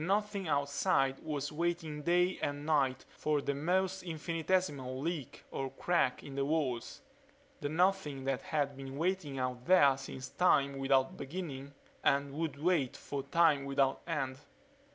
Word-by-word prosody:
The 160 - -3
Nothing 200 -1 0
outside 140 -1 +1
was 145 -2 -3
waiting 160 -1 -2
day 180 +3 +2
and 145 0 -2
night 135 -4 +1
for 150 -1 +1
the 140 0 -1
most 185 +6 0
infinitesimal 165 -5 -1
leak 155 -2 -4
or 135 0 -3
crack 135 -1 0
in 140 - -8
the 140 0 0
walls; 140 - -1 0.6
the 145 - -2
Nothing 160 -4 +1
that 135 -1 -1
had 145 -3 -1
been 135 0 -7
waiting 165 -4 -1
out 125 -1 -3
there 145 -7 +6
since 130 -1 -7
time 140 -6 +3
without 135 -1 +2
beginning 140 -3 -6 0.3
and 140 0 +2
would 155 -1 -2
wait 155 -5 +1
for 140 -1 -4
time 150 0 +3
without 135 -1 +1
end. 135 -5 -2
145 Hz, 150 wpm, -33 LUFS, 135-170 Hz, 0.6 s, there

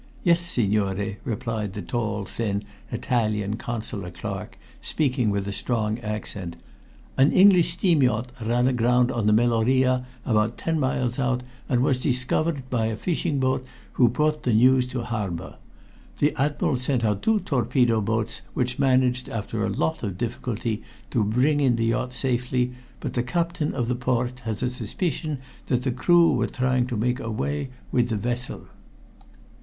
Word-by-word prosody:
"Yes, 170 -2 +5
signore," 105 - 0
replied 110 -4 -3
the 105 - -5
tall, 110 -2 -2
thin 100 0 -2 0.3
Italian 110 -4 0
Consular 110 -6 -5
clerk, - - -6 0.2
speaking 130 -7 0
with 100 -1 -1
a 100 - -3
strong 110 0 -1
accent. 105 -5 -5 0.6
"An 135 +2 +6
English 185 -3 +6
steam 170 -7 +3
yacht 125 -1 +1
ran 120 +3 +2
aground 125 0 +3
on 115 -5 0
the - - +5
Meloria 125 +3 +3 0.2
about 110 0 +1
ten 165 -1 -1
miles 130 -2 0
out, 125 -1 0 0.3
and 125 -3 +3
was 130 -2 +2
discovered 130 +2 0
by 115 -3 +1
a 110 - -2
fishing 160 +1 -1
boat 130 0 +1 0.3
who 120 -2 +4
brought 150 +5 +1
the 120 -4 +1
news 125 +2 +5
to 125 -1 -4
harbor. 100 -7 -4 0.6
The 145 0 +2
Admiral 145 -1 +1
sent 125 -1 0
out 105 -2 0
two 220 -1 +3
torpedo 120 -3 +2
boats, 110 +1 -1
which 125 +1 -1
managed 130 -2 +2
after 110 0 -3
a - - 0
lot 160 - -1
of 100 -5 -3
difficulty 115 -1 -3 0.3
to 115 - +2
bring 125 +8 +2
in 130 -4 +3
the 115 0 0
yacht 125 +2 0
safely, 125 -1 0 0.3
but - - -4
the 120 - +1
Captain 165 +4 -1
of 120 -3 -1
the 125 - +1
Port 125 0 -1
has 110 +1 -3
a - - +2
suspicion 145 - -2 0.3
that 125 -1 +1
the 130 - 0
crew 170 +7 +4
were - - +1
trying 125 -1 +1
to 125 -3 -3
make 125 +4 0
away 135 +5 -2 0.2
with 120 -1 +2
the 110 - 0
vessel." 120 +3 -3
125 Hz, 160 wpm, -25 LUFS, 110-130 Hz, 0.6 s, An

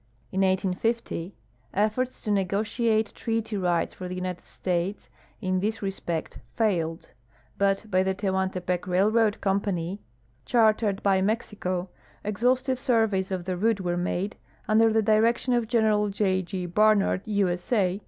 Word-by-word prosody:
In 190 - 0
1850 190 0 0 0.4
efforts 220 +5 0
to 210 - -1
negotiate 215 +3 +1
treaty 225 -1 -2
rights 175 -3 0
for 185 - -7
the 180 - -5
United 180 -1 -4
States 180 +2 -3 0.3
in 185 -2 0
this 215 +3 -2
respect 175 -4 -3 0.2
failed; 170 -7 -1 0.5
but 200 +1 +2
by 185 0 +4
the 190 0 0
Tehuantepec 190 -2 -1
Railroad 210 +4 +2
Company, 195 -2 -1 0.4
chartered 215 -4 +2
l)y 195 -1 +4
Mexico, 190 -3 -1 0.4
exhaust 245 +6 +1
ive 260 -1 0
surveys 225 -8 +1
of 185 -2 -3
the 185 -1 -2
route 210 +2 +1
were 175 -1 -1
made, 180 +3 -2 0.3
under 225 +1 +4
the 220 0 +2
direction 225 +4 +3
of 240 -2 +1
Gen. 215 -3 +2
J. 195 -2 +1
G. 185 0 -4
Barnard, 205 +1 +3
U. 205 -3 +2
S. 175 +3 -4
A. 195 -5 +2
200 Hz, 145 wpm, -26 LUFS, 185-220 Hz, 0.5 s, by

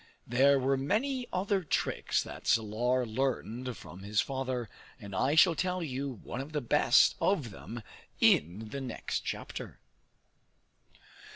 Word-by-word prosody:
There 135 +4 +4
were 135 +1 +1
many 245 - 0
other 190 +1 0
tricks 160 - 0
that - - -9
Salar 120 +3 +2
learned 125 0 -2
from 90 - -11
his 100 +1 -1
father, 130 -3 -2 0.3
and 100 -3 -9
I 130 +10 +2
shall 165 +2 +7
tell 180 +1 -1
you 140 -2 -3
one 125 - -4
of 145 +3 -9
the 150 - +1
best 125 - +4
of 150 - +1
them 115 +4 -8 0.4
in 95 +8 +3
the 140 +4 -5
next 130 - -3
chapter. - - -6
130 Hz, 135 wpm, -31 LUFS, 115-150 Hz, 0.4 s, shall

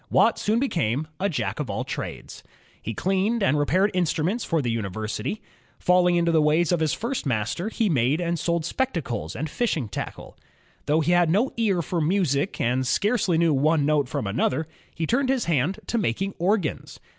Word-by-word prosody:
Watt - - +3
soon 215 +2 +1
became 155 - 0
a 200 - +1
Jack 155 - -2
of - - -3
all - - -2
trades. - - -6 0.4
He 115 - -5
cleaned 195 +4 0
and 150 -6 +3
repaired 185 +8 +2
instnmients 180 +5 0
for 165 - 0
the 120 -5 -1
imiversity. 110 - -4 0.4
Falling 180 -1 +3
into 170 -1 +2
the 160 -1 +4
ways 155 +3 +2
of 175 - +2
his 160 -2 +1
first 235 - -3
master, 120 - -1
he 225 -1 0
made 140 -2 +2
and 170 -1 -1
sold 170 -1 0
spectacles 155 - -2
and 150 +7 -3
fishing 155 - -1
tackle. 100 - -7 0.5
Though 155 +2 +3
he 165 - +1
had 175 -2 +4
no 215 +10 +2
ear 200 -7 +1
for 170 +3 -2
music 165 -2 0
and 125 +2 0
scarcely 200 - +1
knew 165 -2 +3
one 145 +2 +2
note 145 -3 +1
from - - -3
another, 130 +9 0 0.3
he 165 - -2
turned 255 - +1
his 265 -3 +1
hand 165 +3 0
to 235 - -1
making 195 - -1
organs. 185 -2 -1
165 Hz, 185 wpm, -25 LUFS, 145-195 Hz, 0.5 s, the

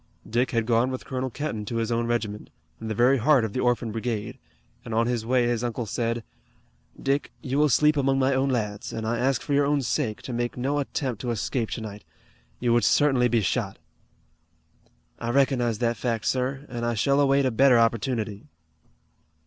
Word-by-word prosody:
Dick 120 +3 +1
had 115 -2 0
gone 120 +2 +2
with 130 -1 -5
Colonel 130 0 -3
Kenton 125 -4 -4
to 115 - -5
his 115 0 -1
own 115 0 0
regiment, 110 -3 -2 0.3
in 115 - -6
the 110 - -2
very 125 +4 +4
heart 130 -1 +4
of 105 - -5
the - - -2
Orphan 120 -2 +1
Brigade, 110 -1 -4 0.4
and 115 - -5
on 115 +1 +3
his 120 -2 -2
way 125 -1 +3
his 120 -1 -1
uncle 120 0 -2
said: 115 +2 -2 0.8
"Dick, 140 +1 -1
you 135 +1 -1
will 150 0 +4
sleep 150 +3 +4
among 135 -1 +2
my 135 0 +2
own 135 +1 +1
lads, 105 -3 -2
and 110 -1 -4
I 115 +1 -1
ask 130 0 +1
you - - -13
for 145 - -1
your 140 0 +3
own 145 -1 +1
sake 120 -4 -2
to 130 - -5
make 120 +1 -2
no 140 +4 0
attempt 130 -5 -3
to 125 - -3
escape 110 +2 -1
tonight. 105 -3 -6 0.6
You 120 -1 +2
would 120 - +3
certainly 135 -4 +4
be 120 -1 +2
shot." 100 0 -1 1.4
"I 115 - -3
recognize 125 -3 +2
that 120 +1 0
fact, 115 -3 -2
sir, 135 +2 -1
and 120 -1 -5
I 120 0 0
shall 140 +6 +2
await 140 -1 +3
a 130 - +2
better 130 +2 +5
opportunity." 115 -2 0
120 Hz, 200 wpm, -25 LUFS, 115-135 Hz, 1.4 s, better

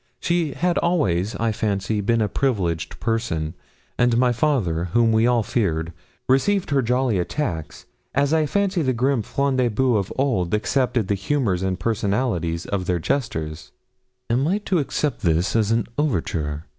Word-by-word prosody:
She 170 -4 0
had 175 +5 +1
always, 105 - +1
I 115 +2 0
fancy, 105 0 -1
been 115 +2 +2
a - - +1
privileged 95 -9 -1
person, 110 -9 -1 0.5
and 120 -1 +3
my 125 0 +4
father, 115 - 0
whom 115 -1 +4
we 110 +1 +3
all 120 -2 +3
feared, 85 -7 -1 0.3
received 175 +8 +2
her 140 -1 +3
jolly 125 -3 +1
attacks, 85 - -3 0.3
as 140 +2 +2
I 155 -1 +2
fancy 200 0 +1
the 130 -4 +1
grim 125 +1 +1
Front 140 +4 -1
de 125 -2 +2
Boeufs 110 -4 +1
of - - -7
old 105 -9 +1
accepted 120 -1 0
the 100 - +1
humours 100 -2 0
and 95 -1 -1
personalities 100 -6 -1
of 95 -3 -3
their 90 - +1
jesters. 80 - -3 0.5
'Am 125 +5 +1
I 190 +5 +2
to 185 -3 +2
accept 145 0 -1
this 85 +3 +1
as 110 -2 +2
an 115 +1 +1
overture?' 80 - -1
115 Hz, 165 wpm, -22 LUFS, 90-135 Hz, 0.5 s, my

